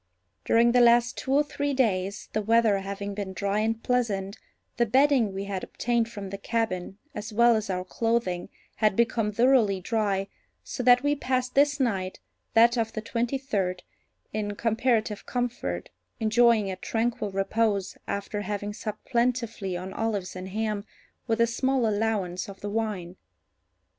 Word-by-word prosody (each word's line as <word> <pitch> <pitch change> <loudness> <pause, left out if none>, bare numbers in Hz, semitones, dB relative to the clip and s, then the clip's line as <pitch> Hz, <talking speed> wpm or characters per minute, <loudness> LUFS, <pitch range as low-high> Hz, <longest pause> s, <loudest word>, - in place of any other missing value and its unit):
During 235 +1 +4
the 245 0 +5
last 240 0 +5
two 265 - -4
or 285 +2 +5
three 285 -1 -2
days, 200 -5 0
the 215 - 0
weather 220 -1 +3
having 200 +1 -5
been 200 -2 -5
dry 200 +2 -1
and 225 +1 -1
pleasant, 205 -6 0 0.4
the 235 0 +2
bedding 260 -2 +4
we 195 +1 -4
had 195 -2 -4
obtained 235 -1 -1
from 200 -4 -7
the 200 - -5
cabin, 200 -4 -2 0.2
as 210 +2 -6
well 235 +2 +5
as 215 -2 -2
our 180 -1 -2
clothing, 225 -4 -1 0.3
had 215 -3 +2
become 225 -1 +1
thoroughly 230 -3 +3
dry, 200 -1 0 0.4
so - - -5
that 245 +1 +5
we 290 0 +3
passed 255 -3 -1
this 285 +1 +3
night 195 -8 -1 0.4
(that 235 +2 +6
of 225 -1 -1
the 220 - -3
twenty 235 +4 -1
third) 190 -9 -2 0.5
in 205 -1 -2
comparative 225 -1 0
comfort, 240 - -3 0.3
enjoying 225 -2 +3
a - - -3
tranquil 225 +1 -1
repose, 200 0 0
after 200 +1 -3
having 205 +1 -3
supped 215 -1 -6
plentifully 235 -6 -1
on 185 +2 -6
olives 205 -5 -2
and 185 +1 -6
ham, 210 0 -2 0.4
with 225 -1 0
a 230 - +6
small 260 +2 0
allowance 205 -4 -1
of 195 - -11
the 205 - -4
wine. 205 -5 -3
220 Hz, 160 wpm, -27 LUFS, 200-235 Hz, 0.5 s, that